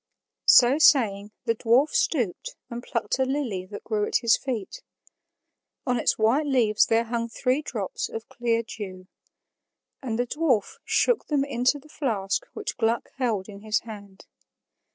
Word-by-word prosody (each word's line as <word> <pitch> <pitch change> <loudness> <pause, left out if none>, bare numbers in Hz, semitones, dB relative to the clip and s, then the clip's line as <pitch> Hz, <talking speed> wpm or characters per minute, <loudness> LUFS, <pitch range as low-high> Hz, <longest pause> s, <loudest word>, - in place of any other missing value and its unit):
So 255 +4 +7
saying, 210 -10 +4 0.2
the 230 - +2
dwarf 240 +6 +3
stooped 300 - -1 0.2
and 235 0 -5
plucked 255 - -2
a - - +4
lily 260 -9 -2
that 205 +1 -9
grew 210 -2 -1
at - - -5
his 235 -2 +4
feet. 260 - -5 1.0
On 250 -3 +1
its - - +1
white 245 +8 +2
leaves 230 -6 +3
there 225 +1 +3
hung 235 0 -3
three 255 +4 0
drops 215 -10 -4
of 225 0 -7
clear 230 -1 -1
dew. 190 -5 -8 1.0
And 235 -5 -3
the 245 - 0
dwarf 255 -6 0
shook 485 -3 +1
them 285 -2 +1
into 260 +1 +1
the 290 - -16
flask 210 - -2
which - - -5
Gluck 230 0 0
held 225 -7 -1
in 200 -2 -10
his 215 +1 -1
hand. 205 -3 -11
235 Hz, 155 wpm, -25 LUFS, 210-265 Hz, 1.0 s, So